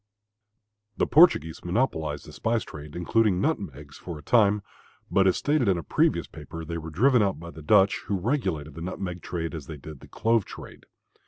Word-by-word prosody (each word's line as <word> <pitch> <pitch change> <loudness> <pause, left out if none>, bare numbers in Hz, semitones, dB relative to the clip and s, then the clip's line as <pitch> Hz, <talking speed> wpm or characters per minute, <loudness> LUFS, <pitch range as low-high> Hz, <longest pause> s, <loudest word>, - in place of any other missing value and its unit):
The - - +2
Portuguese 120 - +4
monopolized 85 - -1
the - - -12
spice 115 0 0
trade, 75 0 -10
including 95 +2 +2
nutmegs, 70 -5 -3
for 85 -3 -7
a 75 - -12
time, 105 -3 +3 0.5
but 95 -1 +4
as 95 - +3
stated 145 -5 +1
in 95 -3 +3
a 85 - -4
previous - - +1
paper, 80 +2 -9
they 85 +1 -4
were 80 0 -7
driven 120 - +3
out 100 -4 0
by 85 +1 -9
the 80 - -11
Dutch, 95 +5 +4
who 100 - 0
regulated 90 - -2
the 80 - -9
nutmeg 90 0 -5
trade 85 -2 -4
as 75 -5 -7
they 80 - -7
did 75 0 -10
the - - -14
clove 115 -1 +1
trade. - - -12
90 Hz, 190 wpm, -26 LUFS, 80-105 Hz, 0.5 s, Portuguese